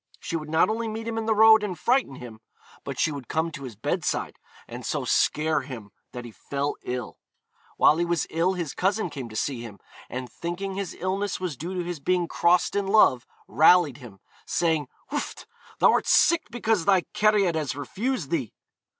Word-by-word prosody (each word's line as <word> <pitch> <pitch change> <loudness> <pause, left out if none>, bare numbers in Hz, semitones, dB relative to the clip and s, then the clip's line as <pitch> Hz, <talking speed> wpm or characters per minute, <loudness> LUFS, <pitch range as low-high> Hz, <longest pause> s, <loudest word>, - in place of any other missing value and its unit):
She 170 - -5
would 155 -2 -4
not 160 +1 +3
only 225 +1 -2
meet 225 +1 -5
him 225 -1 -2
in 225 - -4
the 220 - +2
road, 220 0 +7
and 195 -4 -4
frighten 245 - +1
him, 120 -4 -10 0.4
but - - -6
she - - +2
would 140 -5 -7
come 160 +1 -1
to 140 -3 -8
his 120 -4 -8
bedside, 110 - -2 0.3
and - - -8
so - - -2
scare 155 -1 +2
him 120 -7 -9 0.2
that 125 -1 -7
he 120 - -9
fell 140 +5 -3
ill. 125 0 -5 0.6
While 155 - +5
he 175 - +1
was 170 -2 0
ill 170 +4 +1
his 170 -5 -4
cousin 195 -1 0
came 135 -5 -6
to 110 - -11
see 125 +1 -2
him, 110 -4 -9 0.3
and 125 0 -5
thinking 175 - -5
his 195 -2 -4
illness 195 +2 -2
was 180 -5 -3
due 175 +8 -6
to 180 - -2
his 175 -2 -5
being 180 +3 0
crossed 175 +3 +2
in 200 -1 0
love, 195 - +4 0.2
rallied 160 -3 +5
him, 115 -8 -13 0.3
saying, 160 -4 0 0.2
'Wfft! - - -4 0.3
thou'rt - - +3
sick 340 -1 +4
because 225 -6 0
thy 190 -2 +4
cariad 210 -4 +3
has 155 -5 -2
refused 185 - -3
thee.' 140 -10 -2
170 Hz, 195 wpm, -25 LUFS, 140-195 Hz, 0.6 s, road